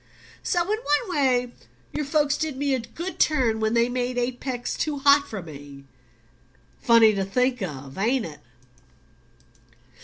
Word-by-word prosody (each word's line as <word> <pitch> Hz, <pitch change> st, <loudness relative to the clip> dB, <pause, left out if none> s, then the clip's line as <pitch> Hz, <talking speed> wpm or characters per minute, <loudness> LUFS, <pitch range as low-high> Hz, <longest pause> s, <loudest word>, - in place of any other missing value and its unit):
So 350 Hz, -3 st, +1 dB
in 425 Hz, +5 st, -1 dB
one 350 Hz, +1 st, 0 dB
way 250 Hz, -4 st, +2 dB, 0.4 s
your 300 Hz, -, -2 dB
folks 290 Hz, 0 st, +1 dB
did 310 Hz, -4 st, -3 dB
me 280 Hz, 0 st, 0 dB
a 260 Hz, -, +1 dB
good 330 Hz, +11 st, -7 dB
turn 250 Hz, -8 st, +2 dB
when 220 Hz, +1 st, 0 dB
they 235 Hz, 0 st, +3 dB
made 245 Hz, 0 st, -2 dB
Apex 245 Hz, 0 st, -3 dB
too 300 Hz, -2 st, -2 dB
hot 280 Hz, +1 st, +4 dB
for 205 Hz, -5 st, -6 dB
me: 140 Hz, -3 st, -11 dB, 1.0 s
funny 230 Hz, -2 st, +6 dB
to 195 Hz, -1 st, -1 dB
think 250 Hz, +5 st, 0 dB
of, 140 Hz, -6 st, -6 dB
ain't 240 Hz, +4 st, +1 dB
it?" 155 Hz, -3 st, -9 dB
250 Hz, 150 wpm, -24 LUFS, 220-285 Hz, 1.0 s, funny